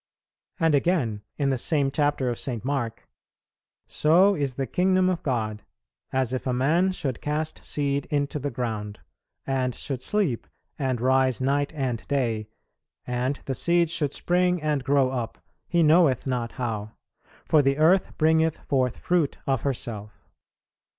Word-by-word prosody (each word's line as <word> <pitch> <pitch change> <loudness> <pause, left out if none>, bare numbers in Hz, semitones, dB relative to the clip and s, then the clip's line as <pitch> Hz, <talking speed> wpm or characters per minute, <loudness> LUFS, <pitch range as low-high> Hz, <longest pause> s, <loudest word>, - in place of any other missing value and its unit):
And 165 -2 +3
again, 135 - +1 0.2
in 140 -2 +1
the 130 -2 0
same 140 -1 +1
chapter 145 -3 +1
of 120 - -4
St. 120 -4 -3
Mark, 130 -5 -3 0.8
"So 180 +6 +4
is 140 -7 -1
the 135 - -2
kingdom 185 +4 +2
of 175 -1 -3
God, 110 -7 -2 0.5
as 130 -1 0
if 130 - -3
a 125 - +1
man 160 +9 +2
should 135 -9 -3
cast 155 +1 -3
seed 140 -1 -1
into 145 0 -1
the 145 +1 -2
ground, 110 -6 -4 0.4
and 130 -2 -1
should 135 -3 -4
sleep, 180 - 0 0.3
and 130 -4 -1
rise 130 0 +2
night 140 +2 0
and 130 -5 -2
day, 115 -6 -1 0.6
and 125 +3 -2
the 135 - -2
seed 170 +4 +2
should 145 -4 0
spring 180 0 +1
and 150 -3 -1
grow 135 -1 +2
up, 120 -3 -4 0.3
he 170 -1 +2
knoweth 155 -5 +4
not 125 -3 -2
how; 110 -4 -4 0.5
for 155 - +4
the 135 0 +1
earth 170 +5 +3
bringeth 160 0 +3
forth 130 -3 0
fruit 175 -5 0
of 135 -3 0
herself." 110 -6 -4
135 Hz, 150 wpm, -25 LUFS, 125-155 Hz, 0.8 s, So